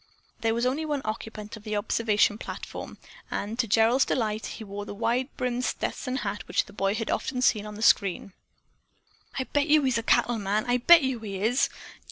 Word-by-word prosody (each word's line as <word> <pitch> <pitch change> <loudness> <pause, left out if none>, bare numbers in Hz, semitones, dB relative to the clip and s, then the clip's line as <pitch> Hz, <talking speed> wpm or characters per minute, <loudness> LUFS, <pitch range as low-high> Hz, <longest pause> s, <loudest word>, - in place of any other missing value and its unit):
There 225 0 +1
was 235 +1 0
only 270 +5 0
one 295 -3 -2
occupant 215 0 -5
of 215 - -13
the 215 -1 -3
observation 210 0 +1
platform, - - -7 0.3
and 215 +4 -4
to 235 - +2
Gerald's 225 +5 +4
delight, 220 -3 -1
he - - -7
wore 205 0 -6
the 205 - -8
wide 245 +5 0
brimmed 250 0 -1
Stetson 255 0 -2
hat 200 +1 -4
which - - +1
the 200 - -15
boy 195 0 0
had 225 0 -2
often 255 -1 -2
seen 215 -4 +2
on 210 - -8
the 215 - -5
screen. 195 -2 +2 1.0
"I'll 260 - -1
bet 290 +1 +2
yo' 305 0 +5
he's 255 -3 +2
a - - -2
cattle 235 0 +2
man. 205 +3 0
I 245 0 +3
bet 325 +6 +7
yo' 260 -3 -1
he 205 -3 -5
is!" 245 +4 +2
225 Hz, 205 wpm, -27 LUFS, 210-250 Hz, 1.0 s, bet